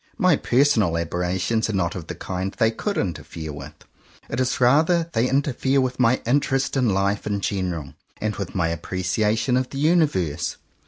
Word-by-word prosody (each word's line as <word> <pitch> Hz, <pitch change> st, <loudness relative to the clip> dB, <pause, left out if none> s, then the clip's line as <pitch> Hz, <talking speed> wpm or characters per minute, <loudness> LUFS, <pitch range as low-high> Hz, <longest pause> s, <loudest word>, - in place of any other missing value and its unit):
My 185 Hz, -6 st, +4 dB
personal 120 Hz, -, +2 dB
aberrations 90 Hz, +7 st, -1 dB
are -, -, -2 dB
not 85 Hz, -3 st, 0 dB
of 85 Hz, -4 st, -7 dB
the -, -, -5 dB
kind 95 Hz, +1 st, -4 dB
they 110 Hz, -2 st, +2 dB
could 200 Hz, -, -3 dB
interfere 80 Hz, -3 st, -4 dB
with. 70 Hz, -, -9 dB, 0.6 s
It 120 Hz, -, -2 dB
is 130 Hz, -1 st, 0 dB
rather 155 Hz, +7 st, +4 dB
that 165 Hz, 0 st, -16 dB
they 120 Hz, +1 st, +2 dB
interfere 135 Hz, 0 st, +1 dB
with 130 Hz, -1 st, -1 dB
my 125 Hz, 0 st, +3 dB
interest 135 Hz, +2 st, +1 dB
in 125 Hz, -4 st, +2 dB
life 100 Hz, +1 st, 0 dB
in 100 Hz, -1 st, -1 dB
general, 90 Hz, -7 st, -3 dB, 0.3 s
and 105 Hz, 0 st, -2 dB
with 100 Hz, -3 st, -5 dB
my 85 Hz, -3 st, +1 dB
appreciation 105 Hz, +8 st, 0 dB
of 130 Hz, 0 st, -1 dB
the 135 Hz, -, -7 dB
Uni 160 Hz, +3 st, +4 dB
verse. 85 Hz, -, -3 dB
110 Hz, 180 wpm, -23 LUFS, 90-135 Hz, 0.6 s, My